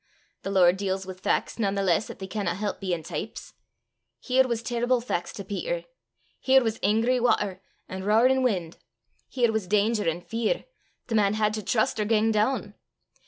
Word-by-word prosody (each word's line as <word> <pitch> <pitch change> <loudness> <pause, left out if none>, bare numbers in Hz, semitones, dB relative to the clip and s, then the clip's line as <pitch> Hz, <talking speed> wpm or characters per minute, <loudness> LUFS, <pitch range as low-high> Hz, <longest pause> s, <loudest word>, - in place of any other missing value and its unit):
The - - -5
Lord 185 -2 +4
deals 190 -1 -2
wi' 190 - -6
fac's 185 +5 -1
nane 200 -3 0
the 200 - 0
less 185 +2 +1
'at - - -8
they 190 - -6
canna 190 -3 -2
help 205 0 -3
bein' 175 -4 -2
teeps. - - -6 0.7
Here 255 - +2
was 235 -2 -2
terrible 240 +1 +1
fac's 205 -7 -3
to 200 - -7
Peter. - - -3 0.6
Here 265 0 +4
was 225 -1 -2
angry 230 +4 +2
watter 215 -5 +1 0.3
an' 190 0 -6
roarin' 240 +6 +4
win'; 185 -10 0 0.5
here 240 -3 +1
was 220 -4 -2
danger 210 -1 +2
an' 165 +2 -4
fear: 225 +4 -2 0.4
the 230 - -5
man 210 -1 +3
had 215 0 +1
to 215 - -3
trust 220 +1 0
or 210 - +1
gang 220 +1 +2
doon. 215 -1 0
215 Hz, 180 wpm, -26 LUFS, 195-235 Hz, 0.7 s, Lord